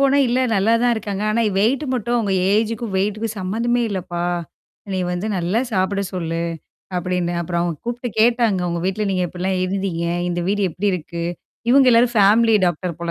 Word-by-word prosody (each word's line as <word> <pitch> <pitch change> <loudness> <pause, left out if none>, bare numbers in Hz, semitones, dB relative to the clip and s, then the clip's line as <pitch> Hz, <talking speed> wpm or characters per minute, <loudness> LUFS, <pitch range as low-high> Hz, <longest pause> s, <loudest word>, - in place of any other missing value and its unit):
போனா 275 0 +4
"இல்ல 245 +2 +1 0.2
நல்லா 200 +3 +2
தான் 245 0 +3
இருக்காங்க. 205 -2 -4
ஆனா 230 +2 +1 0.2
வெயிட் 240 +8 +2
மட்டும் 240 0 -1
அவுங்க 215 -4 0 0.2
ஏஜ்க்கும், 220 0 0
வெயிட்டுக்கும் 210 +3 -1
சம்மந்தமே 230 +6 0
இல்லப்பா. 175 -3 -3 0.7
நீ 185 - 0
வந்து 180 +4 -3
நல்லா 180 +6 0
சாப்பிட 195 +1 0
சொல்லு." 165 -2 -2 0.5
அப்டின்னு. 180 -1 -1
அப்புறம் 170 0 -2
அவங்க 170 -2 -2
கூப்ட்டு 240 +1 -3
கேட்டாங்க. 230 -4 +3
உங்க 170 0 -2
வீட்ல 195 +3 -1
நீங்க 185 -1 0
எப்டிலாம் 185 +2 -2
இருந்தீங்க? 185 -3 -2 0.2
இந்த 175 0 -2
வீடு 205 +1 +1
எப்படி 195 +6 -1
இருக்கு? 170 -1 -4 0.5
இவங்க 270 +1 +6
எல்லாரும் 240 +1 +4
ஃபேமிலி 220 +3 +5
டாக்டர் 175 0 -2
போல 170 0 -2
200 Hz, 170 wpm, -20 LUFS, 180-230 Hz, 0.7 s, இவங்க